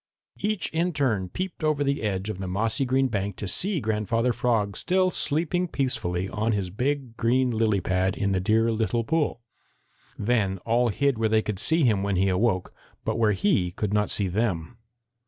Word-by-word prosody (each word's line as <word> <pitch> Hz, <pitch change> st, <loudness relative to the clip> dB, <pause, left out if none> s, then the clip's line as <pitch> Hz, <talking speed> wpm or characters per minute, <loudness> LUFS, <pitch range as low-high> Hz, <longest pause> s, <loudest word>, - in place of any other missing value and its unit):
Each 210 Hz, -1 st, 0 dB
in 170 Hz, +2 st, 0 dB
turn 110 Hz, -11 st, 0 dB
peeped 185 Hz, -, -5 dB
over 155 Hz, -2 st, +2 dB
the 140 Hz, 0 st, 0 dB
edge 100 Hz, -2 st, -2 dB
of 95 Hz, -, -7 dB
the 95 Hz, -, -4 dB
mossy 110 Hz, +7 st, 0 dB
green 130 Hz, +1 st, +2 dB
bank 100 Hz, -4 st, -2 dB
to 100 Hz, -, -5 dB
see 185 Hz, -, +2 dB
Grandfather 115 Hz, +1 st, 0 dB
Frog 110 Hz, -4 st, 0 dB
still 185 Hz, +1 st, +1 dB
sleeping 175 Hz, +3 st, 0 dB
peacefully 95 Hz, -, -1 dB
on 110 Hz, +3 st, -1 dB
his 95 Hz, -3 st, -2 dB
big 130 Hz, +2 st, -2 dB
green 125 Hz, +2 st, +2 dB
lily 110 Hz, -3 st, +1 dB
pad 95 Hz, +1 st, 0 dB
in 100 Hz, -1 st, 0 dB
the 95 Hz, -, +1 dB
dear 110 Hz, +4 st, +2 dB
little 115 Hz, +1 st, 0 dB
pool. 145 Hz, -2 st, -1 dB, 0.7 s
Then 105 Hz, -4 st, +1 dB
all 120 Hz, +1 st, +2 dB
hid 140 Hz, +2 st, 0 dB
where 110 Hz, -1 st, +2 dB
they 110 Hz, 0 st, +3 dB
could 105 Hz, -3 st, -3 dB
see 160 Hz, +7 st, +2 dB
him 110 Hz, -6 st, +3 dB
when 100 Hz, 0 st, 0 dB
he 95 Hz, +2 st, +2 dB
awoke, 95 Hz, 0 st, 0 dB, 0.3 s
but 110 Hz, 0 st, -1 dB
where 110 Hz, -2 st, +3 dB
he 95 Hz, -1 st, +1 dB
could 100 Hz, +3 st, -3 dB
not 105 Hz, 0 st, +1 dB
see 100 Hz, -, +1 dB
them. 95 Hz, +1 st, -2 dB
110 Hz, 190 wpm, -26 LUFS, 100-130 Hz, 0.7 s, they